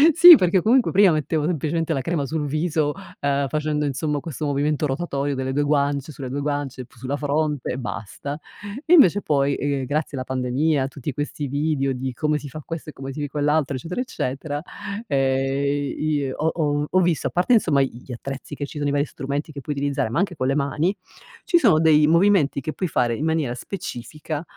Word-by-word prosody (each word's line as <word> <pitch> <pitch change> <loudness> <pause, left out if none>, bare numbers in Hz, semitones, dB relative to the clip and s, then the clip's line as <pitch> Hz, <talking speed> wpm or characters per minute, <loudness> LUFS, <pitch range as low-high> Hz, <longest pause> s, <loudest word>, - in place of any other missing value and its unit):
Sì, 345 +1 +11
perché 180 - +2
comunque 245 +3 +4
prima 195 -2 +6
mettevo 155 0 0
semplicemente 165 0 -1
la 135 - -1
crema 150 +1 -1
sul 150 +2 -2
viso, 155 0 0 0.3
uhm, 140 0 +1
facendo, 150 +1 -1
insomma, 145 +1 -1
questo 155 -1 -5
movimento 145 +1 0
rotatorio 140 -1 -2
delle 130 0 -2
2 145 - +1
guance, 145 0 0
sulle 135 -3 -7
2 140 +3 -3
guance, 145 -3 -3
p - - -27
sulla 130 +4 -4
fronte 150 -1 -1
e - - -4
basta. 130 +4 -6 0.5
Invece 245 - +6
poi, 140 -4 +1
ehm, 140 -2 -1
grazie 145 0 -2
alla 130 - -4
pandemia, 130 +3 0
a - - -1
tutti 140 +1 -6
questi 145 +1 -4
video 140 -1 0
di 130 0 -4
come 150 +3 0
si 145 -1 -8
fa 155 +3 -8
questo 165 -2 -6
e - - -9
come 135 0 -7
si 145 0 -3
quell'altro, 150 0 0
eccetera, 170 - -4
eccetera, 145 - -3 0.5
ehm, 135 0 +1 0.2
i 155 0 0
i 140 -2 -1
ho 155 +4 -2
ho 150 -2 0
ho 185 - +3
visto, 170 -3 +1
a - - -2
parte, 180 +8 +2
insomma, 160 -11 +4
i 135 - 0
gli - - -10
attrezzi 135 +4 -6
che 145 - -4
ci 140 - -10
sono, 145 -1 0
i - - 0
vari 145 0 +2
strumenti 140 +2 -4
che 140 -2 -8
puoi 145 +2 -4
utilizzare, 140 -5 -1
ma 115 - -2
anche 190 -2 0
con 130 -3 -1
le 135 - +1
mani, 150 +6 0 0.5
ci 375 -5 +3
sono 200 - +5
dei 155 -2 +5
movimenti 170 -3 +3
che 155 +3 -4
puoi 185 - -2
fare 120 -4 +1
in 150 - -3
maniera 160 -6 0
specifica, 150 0 -6
145 Hz, 210 wpm, -23 LUFS, 135-155 Hz, 0.5 s, Sì